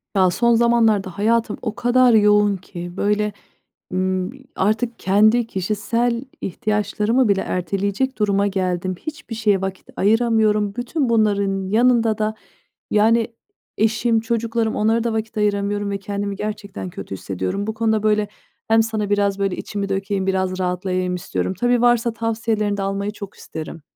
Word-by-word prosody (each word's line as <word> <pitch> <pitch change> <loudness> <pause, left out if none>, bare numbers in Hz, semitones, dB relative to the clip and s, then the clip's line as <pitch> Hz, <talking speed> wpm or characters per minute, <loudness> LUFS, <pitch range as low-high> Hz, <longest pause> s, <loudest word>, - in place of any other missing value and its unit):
Ya, 185 -2 +4
son 235 +5 +3
zamanlarda 225 -5 +2
hayatım 225 +1 +1
o 220 -2 -3
kadar 245 +1 +4
yoğun 210 -2 +4
ki, 175 -1 -8
böyle, 210 +1 +1 0.6
ımm, 185 0 -1 0.2
artık 220 +4 0
kendi 215 +5 +3
kişisel 230 +5 -1 0.2
ihtiyaçlarımı 210 +4 0
bile 195 -1 +2
erteleyecek 200 +8 -2
duruma 200 -1 +2
geldim. 185 -1 -1
Hiçbir 300 -7 -7
şeye 210 -3 +2
vakit 190 0 -5
ayıramıyorum. 215 -1 +2
Bütün 250 +2 -1
bunların 200 -4 +1
yanında 230 0 +3
da 215 0 0 0.6
yani 225 +2 +3 0.5
eşim, 225 +1 +2
çocuklarım 230 0 -1
onlara 225 +2 +2
da 235 -1 -1
vakit 220 0 -3
ayıramıyorum 205 0 0
ve 200 - -2
kendimi 200 0 -3
gerçekten 205 -2 -5
kötü 100 - -7
hissediyorum. 95 - -3
Bu 220 - -2
konuda, 220 -1 0
böyle, 210 -1 +2 0.4
hem 225 0 +4
sana 215 -2 -2
biraz, 200 -1 +1
böyle, 195 -2 0
içimi 200 -1 -4
dökeyim, 195 0 -1
biraz 185 -1 0
rahatlayayım 180 0 -1
istiyorum. 180 +1 -3
Tabii, 245 +5 +1
varsa 240 -1 +3
tavsiyelerini 225 -2 -1
de - - -2
almayı 195 +1 -2
çok 205 -2 -9
isterim. 160 +1 -8
210 Hz, 145 wpm, -21 LUFS, 195-225 Hz, 0.6 s, Ya